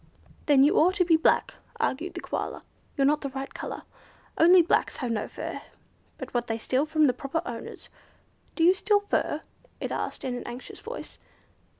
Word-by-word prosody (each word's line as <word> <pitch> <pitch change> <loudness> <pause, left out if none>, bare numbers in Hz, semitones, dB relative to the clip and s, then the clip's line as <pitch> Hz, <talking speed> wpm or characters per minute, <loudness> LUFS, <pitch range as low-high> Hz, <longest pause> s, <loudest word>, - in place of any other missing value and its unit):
"Then 280 -3 +6
you 290 - +4
ought 365 +4 +4
to 365 -3 +3
be 335 -1 +5
black," 320 - +2 0.3
argued 360 - -1
the - - -5
Koala. - - -4 0.3
"You're 275 - +3
not 300 +2 +3
the 275 - -3
right 270 +1 -6
colour. - - -6 0.5
Only 350 +2 +7
blacks 330 - +1
have 250 -3 -2
no 215 -2 -1
fur, - - -6 0.6
but - - -8
what 240 -1 -1
they 225 - -1
steal 260 +6 0
from 310 0 +3
the 255 - +3
proper 275 +6 -3
owners. 235 -1 -7 0.7
Do 325 - +1
you 355 +2 +7
steal 410 +1 +2
fur?" 320 -6 -1 0.4
it - - -4
asked - - -3
in 255 - -2
an 245 - -6
anxious 245 +2 -8
voice. - - -8
295 Hz, 190 wpm, -27 LUFS, 260-340 Hz, 0.7 s, Only